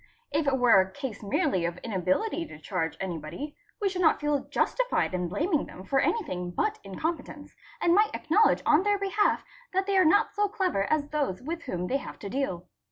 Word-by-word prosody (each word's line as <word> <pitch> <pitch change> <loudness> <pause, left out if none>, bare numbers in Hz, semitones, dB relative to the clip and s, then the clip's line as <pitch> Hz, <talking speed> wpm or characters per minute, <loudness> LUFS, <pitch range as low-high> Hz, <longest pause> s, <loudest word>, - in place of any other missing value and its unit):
If 300 0 0
it 270 -1 +3
were 240 -6 +6
a 190 - -3
case 265 -5 -6
merely 245 - 0
of 170 0 -2
inability 225 - -1
to - - -11
charge 165 -1 -3
anybody, 175 - -5 0.2
we 410 - +1
should 370 -1 -2
not 320 - +4
feel 295 -2 0
justified - - 0
in 180 -1 -1
blaming 305 - 0
them 185 - -10
for 270 +7 +1
anything 185 - -1
but 430 - -1
incompetence, 290 - -5 0.2
and 340 - +3
might 420 +3 +3
acknowledge 400 +8 +3
on 305 +2 +5
their 410 +1 +2
behalf 395 +1 +1 0.3
that 380 +1 +1
they 400 0 0
are - - +6
not 385 +6 +4
so 415 0 +2
clever 375 - 0
as 295 -2 +1
those 280 -10 -2
with 330 +4 -4
whom 180 -8 -3
they 260 +9 +1
have - - -9
to 200 - -7
deal. 195 -8 -2
285 Hz, 200 wpm, -28 LUFS, -, 0.3 s, were